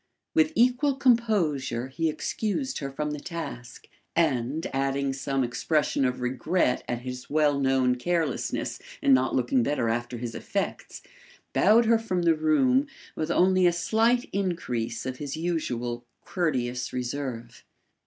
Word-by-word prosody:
With 315 -1 +3
equal 250 +4 +3
composure 175 - +1
he 160 +4 -1
excused 225 - -2
her 140 - -4
from 150 +2 -3
the 150 - -4
task, 140 -8 -7 0.3
and, 150 -1 +1
adding 135 0 0
some 135 0 -1
expression 140 +3 0
of 125 0 -1
regret 125 +3 0
at 120 0 -3
his 125 0 -7
well 145 -1 +2
known 130 -2 +3
carelessness 165 +4 -1 0.2
in 135 - +5
not 130 0 +3
looking 125 0 +2
better 120 -2 0
after 120 +1 -2
his 120 -1 -5
effects, - - -4 0.5
bowed 220 +4 +5
her 225 0 +4
from 185 -6 -1
the 165 -1 +5
room 250 - +3 0.3
with 155 - -2
only 185 0 +4
a - - +4
slight 225 +8 +2
increase 125 - -2
of 130 0 -4
his 145 +1 -5
usual 125 -8 -2 0.2
courteous 125 -8 -1
reserve. 125 -2 -5
145 Hz, 140 wpm, -27 LUFS, 125-180 Hz, 0.5 s, in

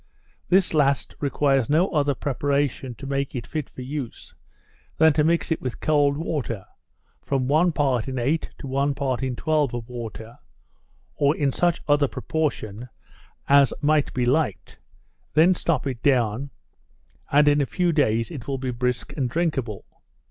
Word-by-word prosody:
This 185 -1 +3
last 140 -3 +2
requires 135 -3 +1
no 165 +6 +3
other 145 -4 +1
preparation 140 -2 -1
to 135 - -10
make 140 0 -2
it 120 - -4
fit 155 -4 -4
for 130 - -9
use, 135 -2 -6 0.6
than 160 -1 +5
to 150 0 +2
mix 165 +2 +1
it 160 - 0
with 130 -2 -5
cold 145 -2 +2
water, 135 - -3 0.6
from 135 -2 -1
one 160 +5 +3
part 135 -6 0
in 130 -1 -4
eight 140 +7 0
to - - -9
one 140 +1 0
part 130 -3 -1
in 130 -2 -2
twelve 150 -3 0
of 115 -2 -6
water, 115 -1 -8 0.7
(or 145 +1 +1
in 140 -2 +1
such 175 +4 0
other 145 -1 +3
proportion 125 -5 -3 0.6
as 140 -1 +5
might 150 0 +2
be 125 -1 -1
liked,) 130 -5 -1 0.6
then 165 +4 +6
stop 165 -5 -1
it 130 -4 -4
down, 125 -1 +1 0.8
and 145 +1 +5
in 145 0 +4
a 140 - 0
few 180 -2 +1
days 115 -6 +1
it 140 -8 -8
will 135 -1 -2
be 130 -1 -3
brisk 125 +1 -2
and 135 -5 -1
drinkable. 135 - -2
140 Hz, 160 wpm, -24 LUFS, 125-150 Hz, 0.8 s, then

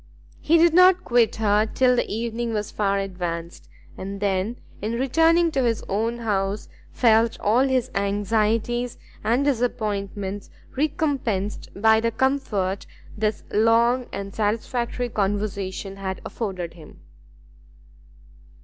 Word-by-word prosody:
He 330 +2 +3
did 335 0 +5
not 365 +1 +6
quit 240 -2 +2
her 215 0 +2
till 250 +3 +3
the - - -1
evening 230 +1 -2
was 210 -1 -2
far 200 -1 0
advanced, 175 -3 -5 0.3
and 195 +1 -6
then, 200 +2 0 0.3
in 215 +3 -2
returning 325 +7 +3
to 275 - 0
his 230 -3 0
own 225 +4 -1
house, 205 -3 -1 0.2
felt 225 -1 +3
all 240 +6 +3
his 260 -2 0
anxieties 215 +4 0 0.3
and 245 +5 +2
disappointments 205 -6 -2 0.3
recompensed 265 -9 -1
by 220 +1 +5
the 230 +1 +1
comfort 225 -6 -1 0.3
this 215 0 -1
long 235 +3 +3
and 200 0 -6
satisfactory 235 +3 -1
conversation 200 -2 -2
had 190 -1 -4
afforded 185 -7 -4
him. 160 -3 -15
220 Hz, 120 wpm, -24 LUFS, 200-245 Hz, 0.3 s, not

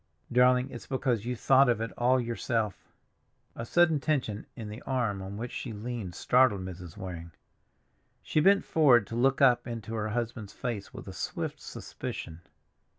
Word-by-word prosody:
Darling, 125 +1 +4
it's 120 - -9
because 125 -5 -1
you 125 - -1
thought 135 +2 +5
of 120 -3 +2
it 115 0 -3
all 125 +2 +3
yourself." 115 -3 -2 0.6
A 115 - -6
sudden 170 -1 +4
tension 130 -8 -1
in 115 -3 -7
the 105 +3 -8
arm 120 -7 -1
on 95 +1 -6
which 120 +2 -5
she 120 - -5
leaned 105 -4 -5
startled 125 -5 +3
Mrs. 90 -2 -8
Waring. 85 -4 -7 0.9
She - - +1
bent 195 +5 +5
forward 130 -9 +5
to 115 - -7
look 135 +3 +2
up 125 -2 +4
into 115 -2 -6
her 110 -1 -2
husband's 115 -2 -3
face, 115 -6 -4
with - - -10
a - - -7
swift - - -4
suspicion. 80 +1 -7
120 Hz, 165 wpm, -29 LUFS, 105-130 Hz, 0.9 s, thought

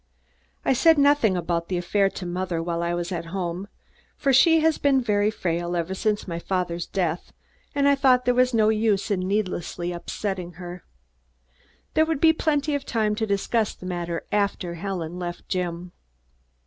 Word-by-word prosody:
I - - +4
said 325 +5 +5
nothing 280 -9 +4
about 170 -1 -2
the 185 - -1
affair 195 +3 +1
to 190 - -7
mother 180 -1 -2
while 170 0 -2
I 170 0 -1
was 175 +1 -3
home, 175 +2 -4 0.5
for 275 -2 +1
she 325 +5 +6
has 320 0 +2
been 275 -2 +3
very 210 -4 +1
frail 175 -4 -2
ever 170 +2 -2
since 210 +2 -1
my 170 -2 -3
father's 175 -2 -2
death 175 -3 -2 0.4
and 280 0 +3
I 280 - +6
thought 260 -2 +3
there 250 - +3
was 250 0 +3
no 220 -2 +3
use 215 -2 +1
in 195 - +1
needlessly 180 -3 -2
upsetting 180 0 -4
her. 175 +1 -9 1.1
There 315 0 +3
would 320 -4 -1
be 320 +1 +6
plenty 305 -2 0
of 285 - -1
time 215 -3 0
to 220 +1 -2
discuss 210 +2 0
the - - -12
matter 175 -2 -3
after 200 -4 0
Helen 175 -1 -4
left 175 -1 -6
Jim. 180 -1 -3
195 Hz, 175 wpm, -24 LUFS, 175-235 Hz, 1.1 s, she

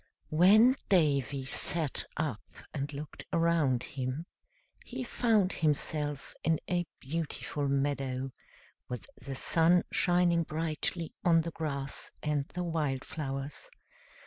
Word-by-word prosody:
When 215 - +7
Davy 140 -6 +2
sat 155 +2 0
up 145 -10 -1 0.3
and 140 0 -3
looked 145 +1 -7
around 165 -7 +2
him 135 +4 -4 0.6
he 255 +1 -5
found 220 -6 +2
himself 150 -2 -1
in 160 -1 +2
a 175 -2 0
beautiful 150 0 -2
meadow, 135 -1 0 0.6
with 125 -2 -5 0.2
the 135 -1 -5
sun 170 +5 +4
shining 175 -1 +4
brightly 160 +1 -2
on 165 -2 +5
the 165 +1 -4
grass 140 -4 -3
and 150 -2 0
the 180 - -4
wild 150 -6 -1
flowers. 140 - -5
155 Hz, 115 wpm, -31 LUFS, 140-170 Hz, 0.6 s, When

